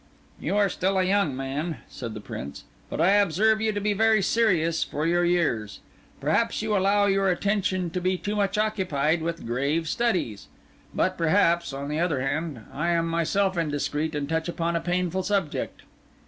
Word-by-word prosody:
"You 200 Hz, -, -1 dB
are 205 Hz, -1 st, +4 dB
still 190 Hz, 0 st, 0 dB
a 185 Hz, -, +3 dB
young 185 Hz, -7 st, +1 dB
man," 135 Hz, +4 st, -3 dB
said 115 Hz, -4 st, -7 dB
the -, -, -5 dB
Prince; 70 Hz, -8 st, -7 dB, 0.3 s
"but -, -, -5 dB
I 185 Hz, -, +5 dB
observe 205 Hz, +2 st, +3 dB
you 220 Hz, 0 st, +1 dB
to 205 Hz, -, -2 dB
be 205 Hz, +1 st, +1 dB
very 220 Hz, 0 st, +3 dB
serious 175 Hz, -7 st, +2 dB
for 150 Hz, +2 st, -3 dB
your 175 Hz, +1 st, +2 dB
years. 165 Hz, -12 st, 0 dB, 0.4 s
Perhaps 210 Hz, +10 st, +1 dB
you 215 Hz, -1 st, 0 dB
allow 200 Hz, +1 st, +3 dB
your 195 Hz, -1 st, +2 dB
attention 185 Hz, -2 st, 0 dB
to 180 Hz, -, -3 dB
be 185 Hz, +1 st, +1 dB
too 205 Hz, +3 st, -3 dB
much 205 Hz, 0 st, 0 dB
occupied 175 Hz, -8 st, +1 dB
with 165 Hz, +1 st, -4 dB
grave 140 Hz, +7 st, 0 dB
studies. 180 Hz, -, -1 dB, 0.4 s
But, 185 Hz, -1 st, 0 dB
perhaps, 170 Hz, -1 st, +3 dB
on 140 Hz, +1 st, -5 dB
the 150 Hz, +2 st, -2 dB
other 165 Hz, -5 st, +1 dB
hand, 145 Hz, -3 st, -3 dB
I 155 Hz, +5 st, -1 dB
am 170 Hz, -1 st, +2 dB
myself 185 Hz, +4 st, +1 dB
indiscreet 150 Hz, 0 st, -1 dB
and 145 Hz, -1 st, -2 dB
touch 160 Hz, +2 st, -1 dB
upon 170 Hz, 0 st, -1 dB
a 170 Hz, -, 0 dB
painful 180 Hz, +1 st, -1 dB
subject." 195 Hz, -5 st, -2 dB
175 Hz, 180 wpm, -26 LUFS, 155-200 Hz, 0.4 s, I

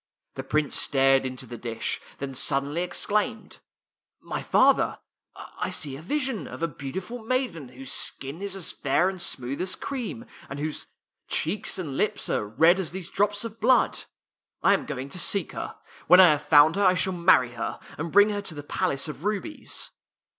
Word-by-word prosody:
The -, -, -5 dB
Prince 155 Hz, -2 st, 0 dB
stared 135 Hz, -1 st, +3 dB
into 130 Hz, 0 st, -6 dB
the 120 Hz, -1 st, -9 dB
dish, 115 Hz, -1 st, -3 dB, 0.2 s
then 135 Hz, -1 st, -5 dB
suddenly 140 Hz, +5 st, 0 dB
ex 180 Hz, -, -1 dB
claimed, 215 Hz, +2 st, -1 dB, 0.3 s
" -, -, -68 dB
My -, -, -1 dB
father, -, -, +3 dB, 0.4 s
I -, -, -5 dB
see 145 Hz, -, -3 dB
here 135 Hz, -, -7 dB
a -, -, -10 dB
vision 260 Hz, -, -1 dB
of -, -, -7 dB
a -, -, +3 dB
beautiful 180 Hz, -, -6 dB
maiden 225 Hz, -, -2 dB
whose 130 Hz, +1 st, -8 dB
skin 140 Hz, +6 st, -2 dB
is 200 Hz, -1 st, -3 dB
as 190 Hz, -4 st, -3 dB
fair 140 Hz, +7 st, +1 dB
and 190 Hz, -2 st, -6 dB
smooth 130 Hz, 0 st, -2 dB
as 185 Hz, 0 st, -1 dB
cream, 245 Hz, -3 st, -5 dB, 0.2 s
and 140 Hz, -, -6 dB
whose 150 Hz, +1 st, -4 dB, 0.4 s
cheeks 205 Hz, +7 st, -1 dB
and 150 Hz, -8 st, -4 dB
lips 210 Hz, -, 0 dB
are 105 Hz, -, -1 dB
red 160 Hz, -, +4 dB
as 185 Hz, -, -2 dB
these 185 Hz, -2 st, -6 dB
drops 205 Hz, +2 st, +1 dB
of 230 Hz, 0 st, -8 dB
blood. 255 Hz, -, +3 dB, 0.6 s
I -, -, +6 dB
am -, -, -1 dB
going 135 Hz, -2 st, -5 dB
to 180 Hz, -, -5 dB
seek 200 Hz, +3 st, 0 dB
her. -, -, -6 dB, 0.3 s
When 180 Hz, -, +8 dB
I 180 Hz, -3 st, +9 dB
have 150 Hz, -1 st, 0 dB
found 155 Hz, +3 st, +6 dB
her 200 Hz, -, +2 dB
I 185 Hz, -1 st, +5 dB
shall 190 Hz, +1 st, +1 dB
marry 170 Hz, -8 st, +4 dB
her, 120 Hz, -1 st, -4 dB, 0.2 s
and 165 Hz, +2 st, -5 dB
bring 205 Hz, +1 st, +6 dB
her 205 Hz, 0 st, -2 dB
to 180 Hz, -5 st, -6 dB
the 145 Hz, -, -7 dB
Palace 140 Hz, 0 st, -1 dB
of 150 Hz, 0 st, -8 dB
Rubies." 210 Hz, +10 st, -3 dB
165 Hz, 195 wpm, -26 LUFS, 140-200 Hz, 0.6 s, I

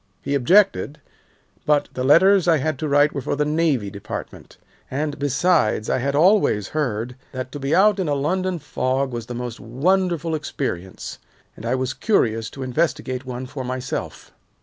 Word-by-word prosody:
He 140 Hz, -, -2 dB
objected, 150 Hz, +2 st, +3 dB, 0.6 s
but 150 Hz, -1 st, +2 dB
the 125 Hz, -, -3 dB
letters 180 Hz, +7 st, +5 dB
I 165 Hz, -2 st, +5 dB
had 150 Hz, 0 st, -2 dB
to 155 Hz, -, -2 dB
write 145 Hz, +1 st, +3 dB
were 140 Hz, -, -3 dB
for -, -, -2 dB
the 150 Hz, +1 st, 0 dB
Navy 150 Hz, -9 st, +1 dB
Department, 100 Hz, -1 st, -8 dB, 0.3 s
and, 145 Hz, +2 st, -3 dB
besides, 145 Hz, -5 st, +1 dB
I -, -, +1 dB
had 140 Hz, +2 st, -1 dB
always 165 Hz, -, +3 dB
heard 125 Hz, -5 st, -2 dB, 0.2 s
that 130 Hz, 0 st, -5 dB
to 145 Hz, -, -6 dB
be 135 Hz, +3 st, 0 dB
out 205 Hz, +1 st, +4 dB
in 180 Hz, -5 st, -1 dB
a 145 Hz, -, +1 dB
London 185 Hz, +6 st, -1 dB
fog 135 Hz, -2 st, -1 dB
was 120 Hz, -1 st, -5 dB
the 125 Hz, -, -6 dB
most 120 Hz, -1 st, -5 dB
wonderful 170 Hz, +6 st, 0 dB
experience, 130 Hz, -, -4 dB, 0.4 s
and 115 Hz, -, -7 dB
I 125 Hz, -, +1 dB
was 130 Hz, 0 st, -2 dB
curious 115 Hz, -, +1 dB
to 135 Hz, -, -7 dB
investigate 130 Hz, -2 st, -1 dB
one 125 Hz, 0 st, -5 dB
for 130 Hz, +1 st, -6 dB
myself. 125 Hz, 0 st, -5 dB
140 Hz, 170 wpm, -22 LUFS, 125-160 Hz, 0.6 s, letters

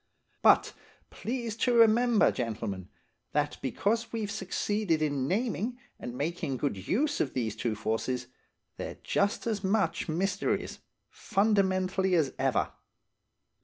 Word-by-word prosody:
But, -, -, +5 dB, 0.4 s
please 235 Hz, -2 st, -3 dB
to 245 Hz, +1 st, +2 dB
remember, 230 Hz, 0 st, +5 dB
gentlemen, 105 Hz, -6 st, -4 dB, 0.4 s
that 150 Hz, 0 st, 0 dB
because 205 Hz, -, 0 dB
we've 220 Hz, -3 st, -3 dB
succeeded 205 Hz, -4 st, 0 dB
in 145 Hz, -4 st, 0 dB
naming 230 Hz, -, -1 dB, 0.2 s
and 120 Hz, 0 st, -6 dB
making 145 Hz, -3 st, -2 dB
good 110 Hz, -9 st, -3 dB
use 290 Hz, +7 st, +1 dB
of 135 Hz, -, -2 dB
these 115 Hz, -5 st, -1 dB
two 115 Hz, -3 st, -1 dB
forces, 115 Hz, +4 st, -2 dB, 0.5 s
they're -, -, -5 dB
just 200 Hz, +1 st, 0 dB
as 215 Hz, -3 st, -1 dB
much 195 Hz, -2 st, +1 dB
mysteries, 190 Hz, +5 st, -1 dB, 0.3 s
fundamentally 190 Hz, -3 st, +1 dB
as 155 Hz, -6 st, +2 dB
ever. 135 Hz, -1 st, +1 dB
190 Hz, 120 wpm, -29 LUFS, 135-220 Hz, 0.5 s, But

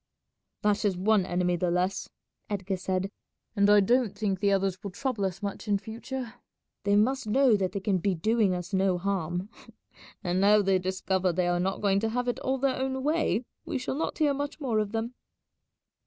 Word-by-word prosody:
"That 210 Hz, -1 st, +2 dB
is 195 Hz, -4 st, +1 dB
one 195 Hz, 0 st, +2 dB
enemy 180 Hz, 0 st, +1 dB
the 180 Hz, +1 st, 0 dB
less," 180 Hz, +3 st, -1 dB, 0.4 s
Edgar 195 Hz, -2 st, -2 dB
said, 185 Hz, +1 st, -2 dB, 0.4 s
"and 200 Hz, -1 st, +4 dB
I 205 Hz, 0 st, +7 dB
don't 235 Hz, 0 st, +2 dB
think 200 Hz, -3 st, -1 dB
the 200 Hz, 0 st, +2 dB
others 195 Hz, -2 st, 0 dB
will 200 Hz, -, -5 dB
trouble 215 Hz, +1 st, -2 dB
us 190 Hz, +1 st, -4 dB
much 200 Hz, +2 st, -4 dB
in 205 Hz, -1 st, +3 dB
future. 235 Hz, +3 st, -6 dB, 0.5 s
They 200 Hz, 0 st, +3 dB
must 250 Hz, +4 st, +2 dB
know 255 Hz, +1 st, +4 dB
that 190 Hz, -2 st, -1 dB
they 200 Hz, -, -2 dB
can 195 Hz, -2 st, +1 dB
be 190 Hz, +1 st, 0 dB
doing 210 Hz, +2 st, +2 dB
us 180 Hz, +3 st, -6 dB
no 190 Hz, -1 st, +2 dB
harm, 180 Hz, 0 st, -2 dB, 0.7 s
and 180 Hz, 0 st, 0 dB
now 205 Hz, +1 st, +5 dB
they 190 Hz, -1 st, +3 dB
discover 185 Hz, 0 st, 0 dB
they 175 Hz, +1 st, 0 dB
are 175 Hz, 0 st, +1 dB
not 190 Hz, +2 st, -1 dB
going 200 Hz, -1 st, +3 dB
to 220 Hz, +2 st, 0 dB
have 245 Hz, +2 st, -2 dB
it 245 Hz, -, -1 dB
all 265 Hz, +1 st, -1 dB
their 265 Hz, 0 st, 0 dB
own 265 Hz, 0 st, -2 dB
way 300 Hz, -5 st, +1 dB, 0.2 s
we -, -, -3 dB
shall 255 Hz, -, -3 dB
not 305 Hz, +4 st, -2 dB
hear 295 Hz, -3 st, +3 dB
much 285 Hz, +2 st, -4 dB
more 245 Hz, -7 st, 0 dB
of 210 Hz, -1 st, -1 dB
them." 225 Hz, +2 st, -3 dB
200 Hz, 200 wpm, -28 LUFS, 185-235 Hz, 0.7 s, I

